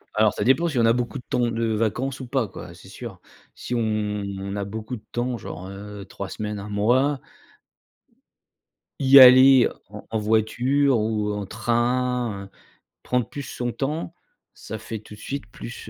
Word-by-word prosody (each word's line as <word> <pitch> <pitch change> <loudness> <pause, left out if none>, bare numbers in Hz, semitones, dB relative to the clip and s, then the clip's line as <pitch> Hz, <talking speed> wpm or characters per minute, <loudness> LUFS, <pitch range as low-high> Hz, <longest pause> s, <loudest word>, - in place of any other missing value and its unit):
Alors 110 0 +4
ça - - -2
dépend, 135 +8 +3
si 145 -6 -3
on 115 - +4
a 115 - +5
beaucoup 125 +2 -2
de 125 - -9
temps - - -1
de 115 0 -1
vacances 120 +5 -1
ou 130 - -7
pas, 125 -4 0
quoi. 85 -2 -10
C'est 95 - -15
sûr. 105 -2 -9 0.4
Si 125 - -6
on 120 - +1 0.6
on 100 +1 -5
a 100 - -2
beaucoup 110 +4 -6
de 110 - -11
temps, 120 0 -2
genre, 90 +1 -8
heu, 100 0 -9
3 100 -1 -7
semaines, 105 -1 -5
1 100 +1 -7
mois 130 +7 +2 1.8
y 135 0 +8
aller 130 0 +9 0.2
en - - -10
en 110 - 0
voiture 120 +5 +2
ou 105 -1 -1
en 105 -1 -4
train, 120 0 -1
heu, - - -15 0.5
prendre 125 -2 0
plus 145 - -6
son 120 -1 -4
temps, 155 +6 -3 0.4
ça 110 - -8
fait 110 -1 -6
tout 105 0 -13
de - - -17
suite 140 -1 -5
plus, 120 - -9
115 Hz, 180 wpm, -24 LUFS, 105-130 Hz, 1.8 s, aller